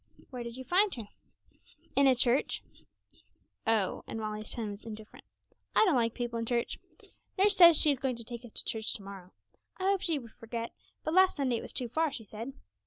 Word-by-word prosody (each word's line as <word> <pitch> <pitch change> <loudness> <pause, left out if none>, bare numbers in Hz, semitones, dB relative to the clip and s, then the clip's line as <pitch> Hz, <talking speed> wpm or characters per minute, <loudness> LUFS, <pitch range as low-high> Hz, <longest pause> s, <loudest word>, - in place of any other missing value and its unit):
'Where 250 -2 -5
did 235 0 -7
you 260 - -6
find 375 +9 +3
her?' 225 -4 -8 0.9
'In 280 0 +5
a 260 - +5
church.' 250 +2 +1 1.0
'Oh!' 220 -4 +2
and 225 - -5
Molly's 215 0 -4
tone 220 -3 -3
was 200 +1 -9
indifferent; 220 -1 -10 0.5
'I - - +6
don't 360 -8 +3
like 230 -2 +1
people 240 -2 -3
in 230 - -2
church. 235 -1 -1 0.6
Nurse 400 +1 +4
says 340 -3 +9
she 300 - +6
is 275 - -1
going 260 -2 -1
to 230 - -6
take 235 +1 -8
us 240 - -12
to - - -1
church 220 -1 0
to 205 - -8
morrow. 195 -2 -10 0.5
I 375 - -6
hoped 390 0 +2
she 330 -3 +2
would 235 -5 -9
forget; 230 0 -5 0.3
last 370 +4 +4
Sunday 260 -5 0
it - - -7
was - - -7
too 250 - -2
far, 315 +6 0
she 230 - -7
said. 225 +5 -7
240 Hz, 210 wpm, -31 LUFS, 225-285 Hz, 1.0 s, says